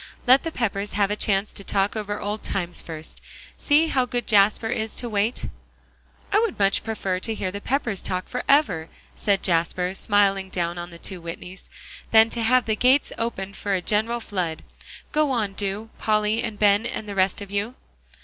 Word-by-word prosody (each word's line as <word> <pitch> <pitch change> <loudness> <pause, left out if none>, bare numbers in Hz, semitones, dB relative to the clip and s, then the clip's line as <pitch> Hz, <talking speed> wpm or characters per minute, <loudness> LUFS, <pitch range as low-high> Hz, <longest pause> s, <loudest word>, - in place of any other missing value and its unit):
"Let 260 +2 +6
the 330 - -4
Peppers 205 -6 -2
have 200 -1 +1
a - - +1
chance 200 -1 +1
to 200 - -8
talk 195 +1 0
over 205 -1 -3
old 210 +1 -3
times 175 -3 -2
first. 160 -1 -8 0.3
See 300 +2 +3
how 260 -5 +1
good 245 -1 -2
Jasper 210 +1 +4
is 220 0 -2
to 245 - -3
wait." 215 +2 -1 0.9
"I 420 - +6
would 450 -4 0
much 195 -1 +3
prefer 195 -5 -2
to 225 +4 -3
hear 185 -3 -3
the 200 +1 -6
Peppers 240 -7 -1
talk 185 0 -3
forever," 245 - +1 0.3
said 200 -2 +1
Jasper, 180 +1 +1
smiling 195 -1 +2
down 175 -1 -2
on 175 0 -6
the 170 - -11
two 180 +1 -6
Whitneys, 180 +2 -9 0.4
"than 225 0 +6
to 235 - -2
have 250 +3 +3
the 220 - +1
gates 255 +6 +3
opened 200 -4 -3
for 200 -1 -1
a - - +1
general 225 +3 +1
flood. 180 -7 -3 0.5
Go 305 -1 +2
on, 220 -6 0
do, 205 +3 -4
Polly 215 +1 +1
and 215 -3 -4
Ben, 205 +2 +4
and 215 - -5
the 205 - -4
rest 190 -1 +1
of 200 -1 -8
you." 205 +5 -2
205 Hz, 190 wpm, -24 LUFS, 195-230 Hz, 0.9 s, Let